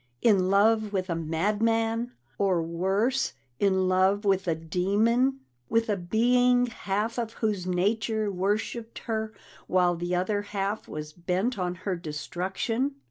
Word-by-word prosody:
In 190 -5 +4
love 215 +2 +3
with 185 -2 -2
a - - 0
madman! 225 +8 0 0.3
Or 185 -4 +2
worse 195 +10 0 0.3
in 190 -2 +2
love 190 +3 +2
with 195 -2 +2
a 165 - +2
demon! 215 - +1 0.3
With 230 0 +1
a 210 - +2
being 245 +6 +3
half 220 0 -2
of 230 -1 -3
whose 210 -6 -2
nature 215 +3 0
worshiped 210 +4 -2
her 220 -1 -2 0.4
while 180 -1 +3
the 175 +1 -2
other 205 +3 0
half 205 +1 -3
was 150 0 -6
bent 185 +7 -1
on 180 -1 -1
her 190 -3 0
destruction! 185 - -3
200 Hz, 135 wpm, -27 LUFS, 180-225 Hz, 0.4 s, In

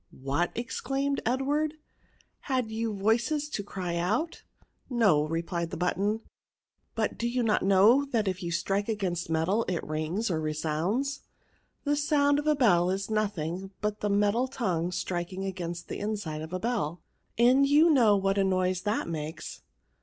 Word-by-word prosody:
What!" 140 +6 -1
exclaimed 270 +3 -2
Edward; 290 +5 0 0.4
" - - -36
had 250 -4 0
you 225 0 -2
voices 235 +9 +1
to 210 - -3
cry 180 -3 -4
out?" 220 - -1 0.5
No/* 200 - +3
replied 170 +1 -2
the - - -5
button 200 +5 0
j - - -33 0.7
but - - -1
do 235 - 0
you 245 0 0
not 215 -2 +2
know 200 +8 +5
that 230 -7 0
if 185 -1 -2
you 170 - -3
strike 195 +5 -1
against 185 -6 -2
metal 165 +8 +1
it 180 -3 -2
rings 155 +8 -2
or 160 -2 0
resounds? 160 - -1 0.6
The 290 0 +1
sound 285 -1 +3
of 295 - -4
a 305 - +4
bell 180 -10 +4
is 195 +3 -2
nothing 195 -4 -2
but 210 0 -2
the 210 - -1
metal 205 +5 +2
tongue 180 -10 -1
striking 180 +1 -3
against 175 -3 -5
the - - -5
inside 200 -7 -3
of 160 - -6
the 185 - -3
bell; 185 -7 -2 0.3
and 255 +4 +5
you 305 +4 +6
know 225 -8 +5
what 195 +1 +1
a - - +4
noise 185 -1 +1
it 210 - 0
makes." 155 -1 -5
200 Hz, 170 wpm, -28 LUFS, 175-240 Hz, 0.7 s, you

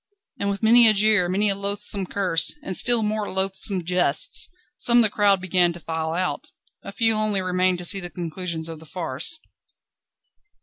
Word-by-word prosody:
And 200 - -1
with 200 +2 -4
many 230 +1 +7
a 215 - +4
jeer, 205 -3 +2
many 200 +3 +1
a - - +3
loathsome 200 -1 -2
curse, 180 - +1
and 190 - -3
still 240 +1 +4
more 210 0 -2
loathsome 190 0 0
jests, 175 -4 0 0.3
some 240 -4 +3
of - - +6
the 215 - +2
crowd 200 -2 +2
began 180 -1 +1
to 170 - -11
file 160 -1 -4
out. 180 +2 -3 0.4
A - - -8
few 225 -2 0
only 215 -2 -1
remained 185 0 0
to 175 - -7
see 195 - +2
the 175 -2 -7
conclusion 170 -1 -6
of 165 -1 -8
the 160 - -15
farce. 170 - -3
190 Hz, 185 wpm, -22 LUFS, 175-210 Hz, 0.4 s, many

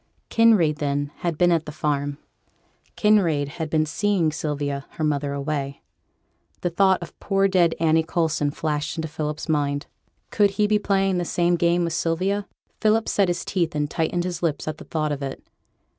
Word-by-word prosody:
Kinraid, 210 -10 +4
then, 145 -1 -1
had 170 -3 -2
been 175 +1 +4
at 165 -2 +1
the - - -4
farm: 145 -1 -1 0.8
Kinraid 175 -10 +3
had 160 0 -5
been 155 0 +2
seeing 180 -1 +1
Sylvia, 145 -3 -3
her 155 - -4
mother 145 -2 0
away. 140 -1 -3 0.8
The 175 - -1
thought 190 0 +3
of 170 - -12
poor 195 -1 +2
dead 175 -4 +3
Annie 160 0 +4
Coulson 160 -3 0
flashed 150 +1 -2
into 160 0 -2
Philip's 150 0 -4
mind. 145 -2 0 0.5
Could 205 -2 +4
he 210 - +4
be 210 0 +2
playing 195 -2 +1
the - - 0
same 175 +1 +1
game 170 +1 +2
with 170 -1 -1
Sylvia? 190 +5 0 0.3
Philip 220 +1 +2
set 200 -2 +2
his 175 -1 -2
teeth 170 -4 -1
and 150 0 -1
tightened 175 +2 0
his 180 -1 -4
lips 155 -4 -1
at 155 0 -4
the - - -10
thought 155 -2 -1
of 145 -1 -3
it. 135 -1 -5
160 Hz, 180 wpm, -24 LUFS, 150-180 Hz, 0.8 s, Kinraid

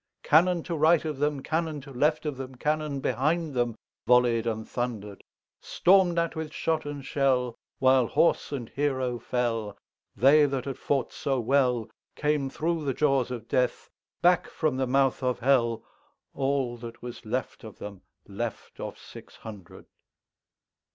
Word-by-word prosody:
Cannon 170 +2 +4
to 170 - -3
right 160 +1 +4
of 150 -3 -3
them, 145 -2 0
Cannon 160 -1 -1
to 140 +1 -12
left 150 +5 +1
of 150 -2 -2
them, 130 0 -7
Cannon 150 0 -1
behind 155 +4 0
themVolley'd 120 0 +1
and 110 -1 -3
thunder'd; 110 -5 -4 0.4
Storm'd 180 -2 +3
at 170 0 0
with 160 -1 -4
shot 160 -1 -1
and 145 -2 -6
shell, 130 -4 +1 0.2
While 130 -2 +4
horse 170 - +2
and 125 -6 -4
hero 130 -4 -1
fell, 115 -5 -2 0.4
They 145 +6 +6
that 135 -2 -3
had 135 -2 -5
fought 135 -3 -1
so 135 -2 -1
wellCame 135 +3 0
thro' 165 +2 -1
the 135 -3 -1
jaws 135 -5 +2
of 120 -2 -6
Death, 125 -1 0 0.3
Back 175 0 +4
from 155 -5 -1
the 130 -1 0
mouth 135 +1 +2
of 125 -1 0
Hell, 120 -3 +2 0.5
All 135 -3 -1
that 115 0 -10
was 120 -1 -8
left 120 +2 -4
of 110 -2 -10
them, 100 -2 -8 0.3
Left 110 +3 -6
of - - -6
six - - -13
hundred. 105 -5 -11
135 Hz, 150 wpm, -27 LUFS, 120-150 Hz, 0.5 s, They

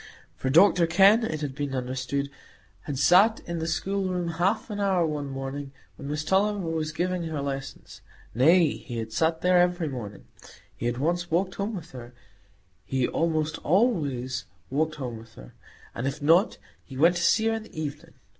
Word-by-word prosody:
For 130 - -3
Dr 170 +3 +5
Kenn, 195 +7 +5
it 155 -8 -3
had 145 -3 -3
been 140 0 -3
understood, 130 +2 -3 0.5
had 145 - -4
sat 185 - +5
in 170 -1 -5
the 160 - -3
schoolroom 180 +1 -1
half 190 +7 -1
an 205 - -4
hour 190 -4 +2
one 150 -3 -3
morning, 135 +1 -6 0.2
when 140 - -9
Miss 150 +1 -2
Tulliver 195 +1 +1
was 155 -1 -2
giving 175 +1 -2
her 160 -2 -3
lessons,—nay, 140 +3 0
he 120 -3 -8
had 110 -1 -5
sat 160 +3 +1
there 180 0 +4
every 175 -2 +1
morning; 110 -8 -7 0.5
he 120 - -3
had 120 0 -2
once 175 +5 -1
walked 180 +3 0
home 205 +2 -3
with 170 -3 -8
her,—he 120 -2 -7
almost 160 -1 -1
always 145 - 0 0.3
walked 155 +3 0
home 125 -5 -5
with 115 0 -16
her,—and 85 - -9
if 135 - -3
not, 165 +8 +3 0.3
he 135 - -11
went 170 +5 +5
to - - -2
see 220 +5 +3
her 225 - +2
in 225 - -3
the 215 -7 -10
evening. 155 +2 -6
155 Hz, 175 wpm, -26 LUFS, 135-180 Hz, 0.5 s, Dr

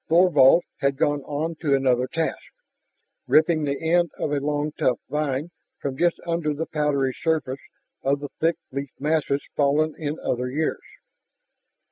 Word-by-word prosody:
Thorvald 165 -2 +6 0.2
had 140 0 +1
gone 145 -1 +1
on 155 +3 -2
to 145 -4 +3
another 130 -2 +2
task, 165 +2 -2 0.9
ripping 155 0 +4
the 140 -1 -2
end 175 -1 +4
of 145 - -2
a 145 - +1
long 145 +1 -1
tough 130 -4 +1
vine 150 +1 -1 0.3
from 140 -2 -3
just 170 +4 +1
under 165 -3 -1
the 160 +3 -2
powdery 145 -4 0
surface 155 -5 -1 0.4
of 140 +1 +1
the 145 0 -6
thick 165 +1 +2 0.2
leaf 140 +1 -4
masses 145 -1 0
fallen 150 +2 +2
in 155 0 -3
other 125 +1 -1
years. 155 +4 -1
150 Hz, 150 wpm, -24 LUFS, 140-160 Hz, 0.9 s, Thorvald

